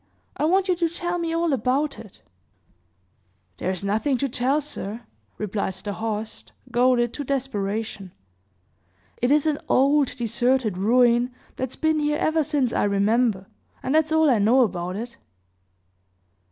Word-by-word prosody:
I - - 0
want 380 +4 +2
you 365 - +2
to 335 -1 +1
tell 350 +1 -3
me 335 -1 -2
all 330 -2 +1
about 270 +4 0
it." 210 - -14 1.4
"There - - -2
is 190 +1 -3
nothing 220 +7 0
to 275 - -1
tell, 260 +3 +1
sir," 235 -7 -6 0.4
replied 200 -2 -3
the 200 +2 -6
host, 220 0 -5 0.2
goaded 240 -1 +2
to 290 - -4
desperation. 220 -7 -3 1.1
"It 245 - +2
is 295 +1 +3
an 305 -2 +1
old, 280 +1 +3
deserted 240 -2 0
ruin 240 +4 +3 0.2
that's 260 -1 -4
been 315 -1 +1
here 300 0 0
ever 315 0 +1
since 280 -5 0
I - - +1
remember; 205 0 +1 0.4
and 260 - -1
that's 315 0 +2
all 315 0 +4
I 245 -6 +4
know 230 +6 +4
about 180 -4 -3
it." 235 +3 -6
250 Hz, 150 wpm, -24 LUFS, 215-295 Hz, 1.4 s, all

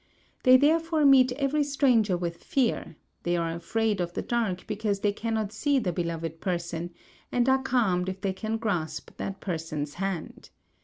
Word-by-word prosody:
They 255 0 +7
therefore 320 +2 +3
meet 260 -2 +6
every 285 +2 +1
stranger 250 -9 +2
with 170 -1 -5
fear, 250 - 0 0.3
they 175 0 0
are 165 -1 -1
afraid 205 +4 -1
of 175 0 -3
the - - -3
dark 225 -7 -1
because 210 -2 -2
they 205 -1 +2
cannot 220 -1 -2
see 285 +5 +1
the 195 -9 0
beloved 165 -1 -3
person, 170 -2 -2 0.4
and 245 0 +2
are 265 0 +4
calmed 215 -9 +1
if 190 0 -5
they 195 -1 -1
can 220 +3 -3
grasp 170 -9 -3
that 195 0 -5
person's 160 -5 -3
hand. 190 -3 -4
205 Hz, 165 wpm, -27 LUFS, 175-250 Hz, 0.4 s, They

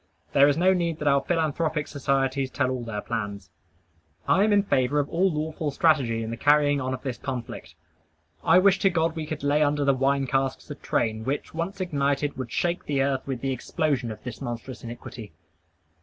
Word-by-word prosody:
There 140 +1 +6
is 145 0 +2
no 185 +2 +4
need 170 -3 -1
that 150 - -3
our 140 -1 +4
philanthropic 160 -1 -1
societies 135 -1 0
tell 130 -1 0
all 125 -2 -3
their 110 -3 -4
plans. 100 -4 -5 0.8
I 190 +4 +4
am 215 - +3
in 205 -1 +4
favor 130 -6 +1
of 145 - 0
all 185 +3 +2
lawful 155 0 -2
strategy 135 -7 +2
in 110 - -4
the 115 - -4
carrying 145 +1 +3
on 130 0 -2
of 130 - -12
this 130 -5 -4
conflict. 130 -4 -6 0.7
I 165 - +5
wish 190 0 +5
to 195 - +4
God 165 -2 0
we 155 -2 -4
could 155 -2 -5
lay 145 +1 +2
under 145 -1 +2
the 140 - +4
wine 135 +1 +1
casks 135 +2 -1
a - - -2
train, 110 -5 -1
which, 135 +5 -3
once 170 +5 -4
ignited, 145 -4 0
would 130 -3 -6
shake 175 0 -1
the 140 -2 +1
earth 135 -1 0
with 130 -3 -3
the 135 - -1
explosion 130 -1 -1
of 110 - -10
this 115 -5 -7
monstrous 120 0 -6
iniquity. 115 -2 -9
140 Hz, 200 wpm, -26 LUFS, 130-155 Hz, 0.8 s, There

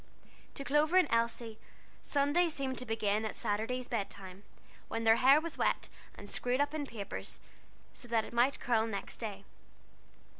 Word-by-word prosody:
To 275 - -5
Clover 300 +5 +3
and 370 - +6
Elsie, 230 -1 0 0.4
Sunday 290 +5 +2
seemed 270 -4 -2
to 250 - -4
begin 215 -1 0
at 220 - -3
Saturday's 225 +5 -1
bed 215 -5 -2
time, 190 0 -10 0.5
when 230 0 -3
their 225 0 +6
hair 270 +4 +7
was 335 +1 -6
wet, - - +1 0.3
and 205 - -10
screwed 250 +5 -1
up 285 +1 +1
in 295 -2 -3
papers, 210 -5 -5 0.7
that 230 -2 +1
it - - -11
might 245 +4 +3
curl 225 -2 +1
next 200 -3 -5
day. 205 -3 -5
235 Hz, 160 wpm, -33 LUFS, 220-280 Hz, 0.7 s, hair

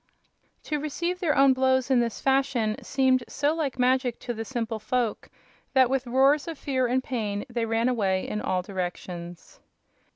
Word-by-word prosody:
To 300 -1 -2
receive 340 +5 -3
their 335 -5 +1
own 275 -1 +6
blows 260 0 +1
in 255 - +5
this 235 -1 -1
fashion 265 -5 +1
seemed 260 -2 +2
so 290 +2 0
like 300 -6 -2
magic 255 -1 +2
to 240 - -3
the 225 0 -4
simple 230 -2 -3
folk 230 +1 -2 0.4
that 260 -2 +4
with 265 -1 0
roars 270 +5 +3
of 330 -3 -5
fear 260 -3 0
and 255 +2 0
pain 210 -5 -3
they 235 -1 -2
ran 225 +1 +1
away 195 -7 0
in 210 - -3
all 185 -1 -1
directions. 175 -2 -6
255 Hz, 170 wpm, -26 LUFS, 225-270 Hz, 0.4 s, own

